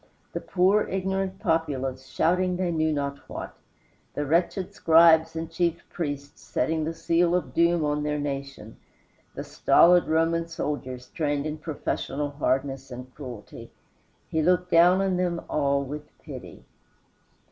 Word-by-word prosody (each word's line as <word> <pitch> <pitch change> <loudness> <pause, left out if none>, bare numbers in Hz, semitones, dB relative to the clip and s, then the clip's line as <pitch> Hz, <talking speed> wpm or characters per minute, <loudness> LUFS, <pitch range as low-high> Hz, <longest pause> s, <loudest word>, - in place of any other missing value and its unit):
The - - -3
poor 190 +3 +2
ignorant 190 0 -2
populace 135 -8 -1
shouting 180 +5 +1
they 180 -1 0
knew 160 -1 +1
not 140 -1 -2
what, - - -7 0.6
the 145 - -1
wretched 170 +5 0
scribes 160 0 +5
and 160 0 -3
chief 170 -1 -1
priests 145 -4 -5
setting 160 -1 -1
the 165 - -3
seal 170 +1 +2
of 145 -8 -2
doom 170 0 +3
on 150 0 0
their 150 0 -1
nation, 135 -5 -5 0.6
the - - -4
stolid 175 +1 +4
Roman 165 +1 +1
soldiers 130 -6 -5
trained 145 -3 -1
in 155 0 -4
professional 150 -2 -3
hardness 135 -1 -1
and 125 0 -9
cruelty 125 -7 -9 0.6
he 160 - 0
looked 180 +2 +2
down 175 +3 +6
on 190 -2 0
them 175 -2 0
all 140 -1 +1
with 150 +2 -7
pity. - - -10
160 Hz, 140 wpm, -26 LUFS, 140-175 Hz, 0.6 s, down